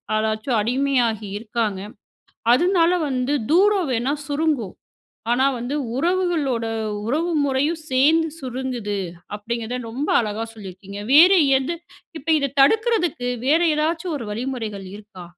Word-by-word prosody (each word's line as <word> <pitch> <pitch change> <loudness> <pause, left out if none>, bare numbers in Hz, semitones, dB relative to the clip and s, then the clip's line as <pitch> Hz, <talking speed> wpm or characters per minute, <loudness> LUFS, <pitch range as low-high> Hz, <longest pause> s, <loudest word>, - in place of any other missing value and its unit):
அதாச்சும் 220 +2 0
அடிமையாகி 240 -3 0
இருக்காங்க! 215 -3 -2 0.7
அதனால 345 +4 +3 0.2
வந்து 260 +2 -1 0.2
தூரம் 385 -1 +4
வேணா 250 +4 0
சுருங்கும். 290 - -1 0.6
ஆனா 260 +2 +2
வந்து 245 +5 -4 0.2
உறவுகளோட 330 -7 0 0.4
உறவு 325 +7 0
முறையும் 290 +4 0
சேர்ந்து 310 +5 +3
சுருங்குது, 250 -5 -4 0.4
அப்டிங்கிறத 235 +3 -4
ரொம்ப 270 +6 -3
அழகா 220 +1 -3
சொல்லியிருக்கீங்க. 195 -1 -9
வேற 345 +6 +8 0.3
எது? 335 +6 -3 0.4
இப்ப 295 - -14
இத 280 -2 -2
தடுக்குறதுக்கு 355 - +2 0.2
வேறு 325 +4 +4
ஏதாச்சும் 325 +2 -1
ஒரு 235 - -6
வழிமுறைகள் 220 -5 -4
இருக்கா? 205 -4 -12
260 Hz, 115 wpm, -22 LUFS, 225-320 Hz, 0.7 s, வேற